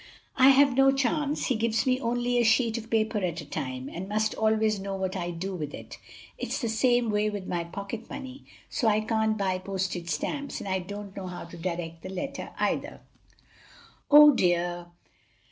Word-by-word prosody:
"I 260 0 +7
have 275 -1 +5
no 270 +1 +6
chance, 280 +2 0
he 260 - +1
gives 225 +3 0
me 255 0 +2
only 245 +1 0
a - - +4
sheet 230 0 +3
of 230 -1 -5
paper 220 -1 +1
at 175 -3 -2
a - - -7
time, 130 0 -5
and 180 +6 -6
must 215 +1 0
always 220 -1 +1
know 195 0 -4
what 190 0 -3
I 175 -2 -3
do 180 +3 -4
with 150 -5 -5
it. - - -10 0.4
It's - - -2
the 235 -5 -2
same 240 0 +2
way 210 0 +1
with 205 -3 -5
my 170 -2 -2
pocket 200 +6 -7
money; 265 +1 -8 0.2
so 235 - -1
I 215 0 +3
can't 220 0 0
buy 190 -2 0
postage 185 -2 -3
stamps; 280 - -3
and - - -7
I 190 0 0
don't 200 +2 -8
know 190 -2 -6
how 180 -1 -7
to 170 - -12
direct 170 -1 -4
the - - -7
letter 190 +9 -5
either." - - -2 1.1
"Oh 295 0 +9
dear! 175 -3 0
210 Hz, 195 wpm, -27 LUFS, 185-240 Hz, 1.1 s, Oh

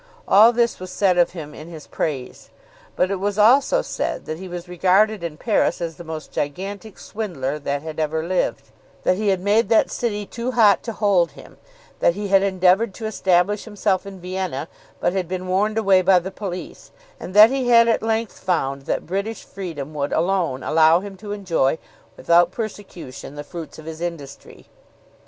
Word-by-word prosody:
All 215 +4 +7
this 235 0 0
was 185 0 -7
said 185 -2 +2
of 175 - +3
him 150 -4 -8
in 155 - -10
his 160 -3 -10
praise, 135 -5 -4 0.5
but 185 - +1
it 195 - -2
was 200 +1 -2
also 270 - +4
said - - -4
that 155 +1 -5
he 190 - -7
was 175 0 -7
regarded 190 +3 +2
in 160 -3 -5
Paris 220 +4 +1
as 165 -2 -5
the 175 - -9
most 160 -1 -7
gigantic 195 +8 -5
swindler 150 -10 -4
that 140 0 -3
had 160 0 -6
ever 160 +1 -1
lived; 185 0 -1 0.3
that 180 - +2
he 215 0 -2
had 190 -2 +2
made 210 +4 +2
that 225 - +3
City 210 -4 -2
too 240 +5 -4
hot 215 -4 +5
to 230 - -5
hold 200 -5 +2
him; - - -15 0.4
that 170 - +3
he 205 0 -4
had 195 0 +5
endeavoured 190 +2 +2
to 225 - -7
establish 195 -1 +1
himself 200 -3 -1
in 195 -1 -9
Vienna, 180 -5 -4 0.3
but 175 - 0
had 190 -3 -2
been 185 +1 -4
warned 205 +4 0
away 195 -4 +4
by 185 0 +5
the 180 +2 -2
police; 185 -3 -7 0.3
and 185 - -8
that 215 +3 +9
he 265 -2 -1
had 230 -1 +6
at 230 - +2
length 225 0 -2
found 140 -7 -2
that - - -2
British 200 +5 -3
freedom 160 -7 -7
would 145 -1 -2
alone 170 -6 0
allow 160 +1 +4
him 200 -1 -8
to 205 +2 -9
enjoy, 170 -9 0 0.4
without 170 +1 +4
persecution, 185 - -7
the 145 - -6
fruits 165 +1 -9
of 155 - -11
his 160 0 -8
industry. 170 -6 -7
185 Hz, 190 wpm, -22 LUFS, 165-205 Hz, 0.5 s, that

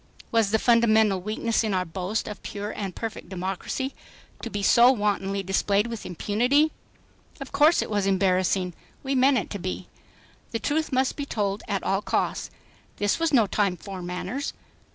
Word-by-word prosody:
Was 225 -3 +3
the 220 - +3
fundamental 220 -4 +4
weakness 220 +3 0
in 210 -3 0
our 180 0 0
boast 185 +5 -3
of 210 - -7
pure 205 +1 -5
and 195 -3 -5
perfect 225 -1 -6
democracy 190 +8 -3 0.5
to 230 - -4
be 205 -2 -3
so 240 +5 +7
wantonly 200 -4 0
displayed 200 +2 +1
with 230 -4 -6
impunity? 245 - +2 0.7
Of 275 - -7
course 300 +4 +4
it - - -8
was 205 -2 +1
embarrassing. 185 -1 +2 0.3
We 270 0 -1
meant 265 +1 +4
it - - -3
to 205 - -4
be. 185 +1 -5 0.6
The 230 - 0
truth 310 +5 -1
must 260 0 +1
be 285 - -4
told 205 -3 -1
at 200 -2 -1
all 195 +1 +1
costs. - - -1 0.5
This 205 +7 0
was 330 -1 +1
no 240 -6 +5
time 195 -2 0
for 195 -1 -8
manners. 180 +10 -4
210 Hz, 175 wpm, -26 LUFS, 195-240 Hz, 0.7 s, so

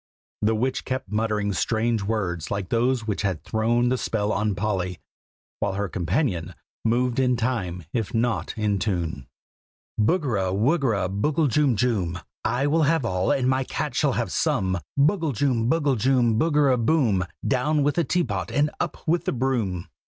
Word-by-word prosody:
The 110 +1 +2
witch 130 +4 -1
kept 130 -1 -4
muttering 105 -1 0
strange 115 +3 0
words 95 -6 -2
like 100 -2 -3
those 120 0 +1
which 105 -3 -2
had 95 -3 -2
thrown 120 +2 +1
the 130 0 0
spell 105 -1 -1
on 105 0 0
Polly; 95 -3 -2 0.6
while 100 - 0
her 100 +1 -1
companion 90 - -1 0.3
moved 120 +2 +1
in 125 -1 +3
time 110 -8 -2
if 115 -4 -1
not 115 -8 -1
in 105 -2 0
tune. 85 -9 -2 0.7
"Buggara 110 - +1
wuggara, 115 - +1
boogle 140 - +1
jum 140 0 +2
jum! 100 -7 0 0.3
I 135 +3 0
will 155 +3 +2
have 165 -6 +1
all, 90 -1 0
and 135 -3 +2
my 130 0 +2
cat - - -3
shall - - +2
have - - -2
some. 95 -1 0 0.2
Boogle 155 - +2
jum! 120 -2 +1
boogle 145 -4 +2
jmm! 120 -1 +2
buggara 145 -5 +3
boom! 115 - +2 0.2
Down 140 +3 +2
with 145 +1 +2
the 170 - +1
teapot 110 - -1
and 150 +1 +2
up - - -4
with 170 +2 +1
the - - +1
broom!" 115 -9 -1
115 Hz, 165 wpm, -24 LUFS, 100-130 Hz, 0.7 s, in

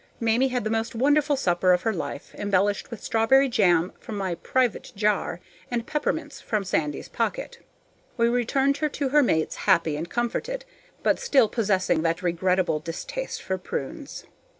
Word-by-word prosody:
Mamie 230 +3 +2
had 250 -3 -1
the 215 - -2
most 225 +1 -1
wonderful 290 +4 +3
supper 180 -6 +2
of 180 0 +1
her 225 - +1
life, 175 - -6
embellished 205 +3 0
with 235 -4 -8
strawberry 265 +5 +4
jam 180 -7 +2
from 215 - -7
my 190 -3 -1
private 245 +7 -1
jar 205 -4 0 0.3
and 235 -1 -2
peppermints 295 -1 -2
from 215 -2 -1
Sandy's 150 -5 -2
pocket. - - -3 0.6
We 235 -1 +3
returned 265 +4 +1
her 305 +1 0
to 280 -1 -2
her 295 +2 +5
mates 160 - +1
happy 170 -4 +4
and 165 +3 -4
comforted, 480 - -2 0.4
but - - +2
still 280 - +4
possessing 195 -7 +1
that 165 +2 -1
regrettable 180 -1 +1
distaste 165 - -5
for 190 0 -2
prunes. 140 -6 -6
220 Hz, 160 wpm, -25 LUFS, 180-265 Hz, 0.6 s, her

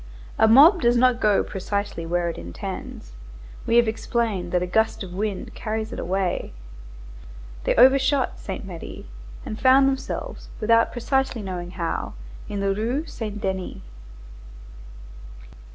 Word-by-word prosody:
A 220 - +6
mob 305 - +7
does 240 0 +3
not 250 0 +4
go 210 -3 +3
precisely 200 -3 -4
where 175 0 0
it 170 - -4
intends. 85 -7 -7 0.6
We 230 - +2
have 235 -1 +5
explained 220 -5 -2
that 180 0 +1
a - - 0
gust 220 +4 0
of 180 -2 -8
wind 200 0 -3
carries 220 0 -4
it - - -5
away. 185 - -2 1.1
They - - +2
overshot 265 +1 +4
Saint 195 0 -6
Merry 175 -4 -8 0.4
and 215 - -6
found 265 +1 +6
themselves, 270 - -4
without 230 +1 +3
precisely 260 -1 -1
knowing 180 -2 -5
how, 170 -2 -3 0.4
in 200 -1 -3
the 195 0 +1
Rue 240 +9 -2
Saint 215 -8 -6
Denis. 190 -1 -3
215 Hz, 135 wpm, -24 LUFS, 190-245 Hz, 1.1 s, mob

